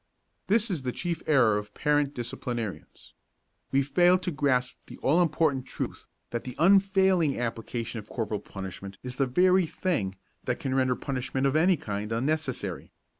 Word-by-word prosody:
This 215 +2 +2
is 165 -6 -2
the 130 -1 -2
chief 170 +3 -3
error 115 -8 +4
of 105 0 -11
parent 145 -1 +1
disciplinarians. 120 -3 -5 0.6
We 135 +1 +3
fail 175 +6 +4
to 185 -1 -3
grasp 130 -4 0
the - - -10
all 160 +6 +4
important 155 -6 +1
truth - - -5 0.2
that 120 - -3
the 125 - -7
unfailing 190 -4 +4
application 115 0 -3
of 105 - -12
corporal 110 -3 -2
punishment 95 0 -8
is 125 0 -6
the 135 - +2
very 180 +6 +4
thing 125 - -1 0.3
that - - -1
can 130 - -2
render 130 -1 +2
punishment 130 +1 -2
of 135 +1 +2
any 175 +3 +4
kind 105 -2 -4
unnecessary. 135 +3 -2
135 Hz, 160 wpm, -28 LUFS, 115-165 Hz, 0.6 s, error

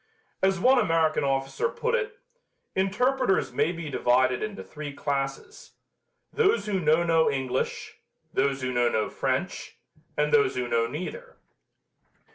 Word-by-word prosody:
As 190 -1 +2
one 255 +6 +5
American 165 -6 +2
officer 135 - 0
put 475 0 -2
it, 450 -3 -1 0.6
"Interpreters 210 +3 +1
may 165 - +1
be 170 -2 -6
divided 130 0 +2
into 215 -2 -5
three 150 -1 -7
classes: 140 - -4 0.6
those 450 0 +2
who 200 -3 0
know 160 0 +3
no 165 -1 +3
English; 130 -2 -3 0.3
those 140 -1 0
who 130 0 -1
know 120 -1 +3
no 110 -2 -1
French; - - -2 0.4
and 150 0 +1
those 145 -1 +4
who 125 -1 -2
know 115 -1 +1
neither." 185 - -7
155 Hz, 135 wpm, -26 LUFS, 135-200 Hz, 0.6 s, one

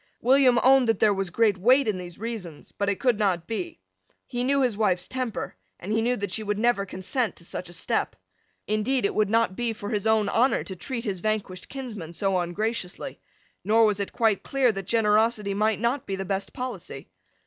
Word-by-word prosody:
William 255 0 +5
owned 265 -1 +6
that 225 - +2
there 210 -1 +4
was 195 -2 -2
great 205 0 +2
weight 255 +7 +4
in 205 -4 0
these 175 -1 -8
reasons, 205 -8 -7
but 200 0 -1
it 200 - -1
could 245 -5 +2
not 185 -5 +1
be. 330 - -5 0.5
He 245 -1 -3
knew 275 +1 +2
his 245 -4 +1
wife's 190 -4 +1
temper; 255 - -4 0.2
and 200 +5 -4
he 220 - +2
knew 245 +2 +1
that 200 -4 -4
she 220 - -1
never 210 +1 +1
would 195 - -6
consent 205 +6 -2
to 170 - -13
such 180 0 -5
a - - -11
step. - - -1 0.5
Indeed 215 +3 0
it - - 0
would 210 -2 +1
not 225 -3 +2
be 235 0 -1
for 205 0 -6
his 210 -1 0
own 220 -2 +3
honour 245 +6 +2
to 190 - -7
treat 235 +5 -5
his 195 -4 -2
vanquished 200 -2 -3
kinsman 215 - -7
so 195 +1 0
ungraciously. 185 +2 -3 0.4
Nor 225 +1 +4
was 210 -2 +1
it 200 - -3
quite 225 -4 +1
clear 270 -3 +2
that 195 -3 -6
generosity 215 -1 +2
might 215 +1 +1
not 240 +4 -1
be 195 - -2
the 195 0 -4
best 195 +1 -3
policy. 255 -1 -6
215 Hz, 210 wpm, -26 LUFS, 195-240 Hz, 0.5 s, owned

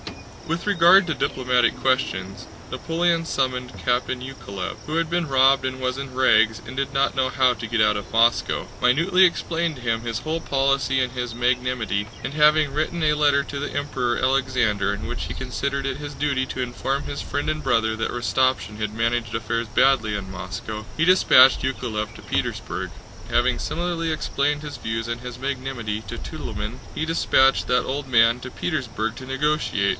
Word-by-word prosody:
With 165 +4 -3
regard 190 -1 +6
to 160 - 0
diplomatic 125 -4 +1
questions, 100 -7 -1 0.3
Napoleon 165 0 0
summoned 130 -4 -2
Captain 125 0 0
Yákovlev, 125 -7 -6
who 155 - -4
had 165 -1 0
been 170 -2 -1
robbed 135 0 +4
and 130 0 -3
was 130 0 -2
in 135 -1 -6
rags 115 -4 +3
and 130 - -8
did 140 0 -2
not 135 0 +1
know 130 -1 +1
how 130 -1 +3
to 115 -1 -6
get 115 +1 -1
out 105 0 +4
of 100 - -6
Moscow, 115 +1 +2
minutely 165 +9 +4
explained 170 -2 +1
to 125 - -11
him 115 -1 -1
his 115 -1 -3
whole 160 +6 -3
policy 135 -1 +1
and 125 -1 -1
his 125 -2 -4
magnanimity, 120 -5 0
and - - -5
having 150 -1 +4
written 155 +3 -1
a 150 -1 +4
letter 145 -2 +3
to 140 0 -6
the 145 - -4
Emperor 130 -4 -1
Alexander 130 -6 +1
in - - -6
which - - -4
he - - -5
considered 140 0 -3
it 135 -1 -2
his 145 -1 -7
duty 140 -2 0
to 130 - -4
inform 135 +3 -2
his 140 - -5
Friend 145 - -3
and 155 0 -2
Brother 115 -4 +1
that 115 0 -2
Rostopchín 120 -2 0
had 110 -1 -3
managed 115 0 -1
affairs 115 +1 -2
badly 110 -2 +2
in 95 -1 -7
Moscow, 95 +4 -6
he 160 - +2
dispatched 135 -8 +6
Yákovlev 110 -5 -3
to - - -11
Petersburg. - - -3 0.4
Having 120 +1 +2
similarly 165 0 -2
explained 145 -1 -1
his 150 -1 -6
views 115 0 -4
and 120 0 -4
his 125 -1 -8
magnanimity 130 -5 -3
to - - -5
Tutólmin, - - -6
he 160 - -2
dispatched 135 -4 +3
that 125 - +2
old 140 +1 -3
man 115 -1 +5
also 125 +1 -8
to - - -18
Petersburg 115 -8 -2
to 130 - -9
negotiate. 135 -7 0
130 Hz, 185 wpm, -23 LUFS, 115-145 Hz, 0.4 s, regard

